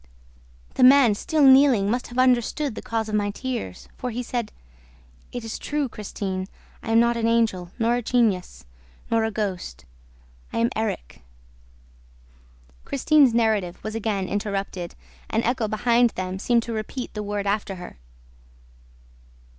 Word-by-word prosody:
The -, -, +1 dB
man, 260 Hz, -3 st, +7 dB
still 305 Hz, +8 st, 0 dB
kneeling, 265 Hz, -6 st, +6 dB
must 245 Hz, +1 st, -1 dB
have 240 Hz, -, -9 dB
understood 255 Hz, +2 st, +2 dB
the -, -, -7 dB
cause 225 Hz, -1 st, -2 dB
of 215 Hz, -, -6 dB
my 205 Hz, -1 st, +1 dB
tears, 225 Hz, -, -5 dB
for 250 Hz, -, -3 dB
he 245 Hz, +1 st, -4 dB
said, 235 Hz, -3 st, -3 dB, 0.8 s
'It 245 Hz, -1 st, -5 dB
is 225 Hz, -, -5 dB
true, 295 Hz, -1 st, -1 dB
Christine!... 195 Hz, -4 st, -5 dB, 0.3 s
I -, -, -7 dB
am 225 Hz, 0 st, +5 dB
not 235 Hz, 0 st, +3 dB
an 230 Hz, -1 st, 0 dB
Angel, 225 Hz, -6 st, +1 dB
nor 235 Hz, 0 st, +2 dB
a -, -, -2 dB
genius, 205 Hz, -, 0 dB, 0.5 s
nor 225 Hz, -1 st, +3 dB
a -, -, 0 dB
ghost... 190 Hz, -, -4 dB, 0.7 s
I -, -, -4 dB
am 230 Hz, +2 st, +2 dB
Erik!'" 215 Hz, -, -4 dB, 1.6 s
Christine's 280 Hz, -3 st, +3 dB
narrative 215 Hz, -6 st, +1 dB
was 215 Hz, -, -4 dB
again 210 Hz, -4 st, -2 dB
interrupted. 195 Hz, -3 st, -3 dB, 0.3 s
An 225 Hz, +1 st, 0 dB
echo 240 Hz, -2 st, 0 dB
behind 235 Hz, +3 st, +3 dB
them 185 Hz, 0 st, -4 dB
seemed 235 Hz, +2 st, +2 dB
to 230 Hz, -, -5 dB
repeat 225 Hz, +4 st, -5 dB
the 210 Hz, -, -4 dB
word 205 Hz, -1 st, -3 dB
after 200 Hz, -1 st, -1 dB
her. 180 Hz, -, -10 dB
225 Hz, 150 wpm, -24 LUFS, 205-245 Hz, 1.6 s, man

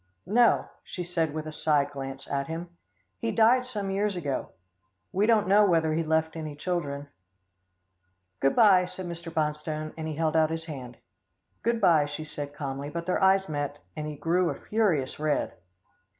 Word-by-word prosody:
"No," 235 Hz, +4 st, +4 dB, 0.2 s
she 180 Hz, -, -5 dB
said 165 Hz, -3 st, -1 dB
with 155 Hz, +1 st, -4 dB
a 155 Hz, -, -5 dB
side 150 Hz, -2 st, +1 dB
glance 135 Hz, -1 st, -6 dB
at 140 Hz, -1 st, -2 dB
him. 165 Hz, +2 st, -5 dB, 0.5 s
"He 230 Hz, -, -1 dB
died 245 Hz, +3 st, +4 dB
some 205 Hz, -6 st, -3 dB
years 200 Hz, +1 st, 0 dB
ago. 145 Hz, -6 st, -3 dB, 0.6 s
We 200 Hz, +3 st, +2 dB
don't 220 Hz, -3 st, +4 dB
know 205 Hz, +2 st, +6 dB
whether 165 Hz, -5 st, +3 dB
he 165 Hz, -, +1 dB
left 160 Hz, 0 st, 0 dB
any 155 Hz, -2 st, -5 dB
children." 145 Hz, -3 st, -3 dB, 1.3 s
"Good 135 Hz, -, +2 dB
bye," 195 Hz, -6 st, +6 dB
said 185 Hz, +1 st, -7 dB
Mr. 170 Hz, -1 st, -6 dB
Bonstone, 155 Hz, -1 st, -2 dB
and 160 Hz, -1 st, -5 dB
he 155 Hz, -, -4 dB
held 160 Hz, 0 st, 0 dB
out 160 Hz, -1 st, +4 dB
his 160 Hz, 0 st, -4 dB
hand. 130 Hz, -6 st, -8 dB, 0.6 s
"Good 235 Hz, 0 st, +1 dB
bye," 165 Hz, -7 st, +4 dB
she 150 Hz, +2 st, -6 dB
said 145 Hz, -1 st, -6 dB
calmly, 140 Hz, 0 st, -4 dB
but 170 Hz, +2 st, -5 dB
their 185 Hz, +3 st, 0 dB
eyes 190 Hz, 0 st, +4 dB
met, 145 Hz, -1 st, -3 dB, 0.2 s
and 150 Hz, -1 st, -4 dB
he 150 Hz, -, -5 dB
grew 170 Hz, +3 st, +1 dB
a -, -, -2 dB
furious 180 Hz, -14 st, 0 dB
red. 150 Hz, -1 st, 0 dB
160 Hz, 180 wpm, -28 LUFS, 150-185 Hz, 1.3 s, know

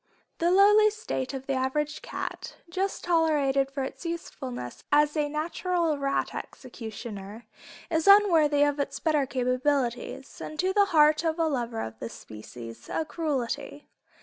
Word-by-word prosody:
The 340 Hz, -, +2 dB
lowly 415 Hz, +3 st, +6 dB
state 425 Hz, -, -4 dB
of 270 Hz, -1 st, -6 dB
the 275 Hz, -, -1 dB
average 285 Hz, +3 st, -1 dB
cat, -, -, -6 dB, 0.2 s
just 385 Hz, +2 st, -2 dB
tolerated 295 Hz, -5 st, +2 dB
for 275 Hz, 0 st, -3 dB
its 265 Hz, -, -7 dB
usefulness 265 Hz, -, -6 dB
as 295 Hz, +1 st, +4 dB
a 295 Hz, -1 st, 0 dB
natural 330 Hz, +1 st, -1 dB
rat 275 Hz, 0 st, -1 dB
executioner, 220 Hz, -3 st, -8 dB, 0.5 s
is 320 Hz, +1 st, +1 dB
unworthy 330 Hz, -8 st, +6 dB
of 290 Hz, 0 st, +1 dB
its 280 Hz, -, -2 dB
better 300 Hz, -4 st, +1 dB
capabilities, 255 Hz, 0 st, -1 dB
and 310 Hz, -, -7 dB
to 370 Hz, +3 st, +1 dB
the 405 Hz, 0 st, +5 dB
heart 305 Hz, -3 st, +4 dB
of 325 Hz, -1 st, 0 dB
a 330 Hz, -, +2 dB
lover 240 Hz, -6 st, -2 dB
of 110 Hz, 0 st, -7 dB
the 115 Hz, -, -5 dB
species, 115 Hz, +2 st, -10 dB
a 320 Hz, -, -1 dB
cruelty. 290 Hz, -2 st, -3 dB
290 Hz, 150 wpm, -27 LUFS, 260-330 Hz, 0.5 s, lowly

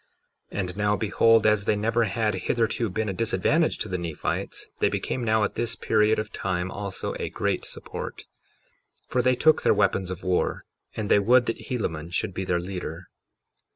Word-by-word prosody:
53:19 -, -, -4 dB
And 90 Hz, -1 st, -3 dB
now 105 Hz, 0 st, +2 dB
behold, 110 Hz, +2 st, +3 dB
as 105 Hz, -2 st, +3 dB
they 105 Hz, -, +2 dB
never 115 Hz, +3 st, +1 dB
had 110 Hz, +1 st, 0 dB
hitherto 115 Hz, -1 st, 0 dB
been 110 Hz, +4 st, -2 dB
a 100 Hz, -, -1 dB
disadvantage 115 Hz, -, +1 dB
to -, -, -3 dB
the 90 Hz, -2 st, -2 dB
Nephites, 85 Hz, -3 st, -4 dB
they -, -, +3 dB
became 125 Hz, -, -2 dB
now 110 Hz, -1 st, +2 dB
at -, -, -1 dB
this 115 Hz, -1 st, -1 dB
period 110 Hz, 0 st, +2 dB
of 110 Hz, 0 st, -4 dB
time 95 Hz, 0 st, -2 dB
also 100 Hz, -1 st, -4 dB
a -, -, -2 dB
great -, -, -1 dB
support; -, -, -7 dB, 0.8 s
for 125 Hz, -, +1 dB
they 130 Hz, +1 st, +3 dB
took 155 Hz, +5 st, +4 dB
their -, -, +4 dB
weapons 100 Hz, -2 st, +1 dB
of 95 Hz, 0 st, -6 dB
war, 90 Hz, -1 st, 0 dB, 0.3 s
and 110 Hz, -2 st, -3 dB
they -, -, +6 dB
would 120 Hz, +5 st, +4 dB
that 115 Hz, -, -4 dB
Helaman 85 Hz, -10 st, -2 dB
should 90 Hz, +2 st, -2 dB
be 95 Hz, -, -3 dB
their 90 Hz, -1 st, +1 dB
leader. 90 Hz, -1 st, -6 dB
105 Hz, 190 wpm, -26 LUFS, 95-115 Hz, 0.8 s, they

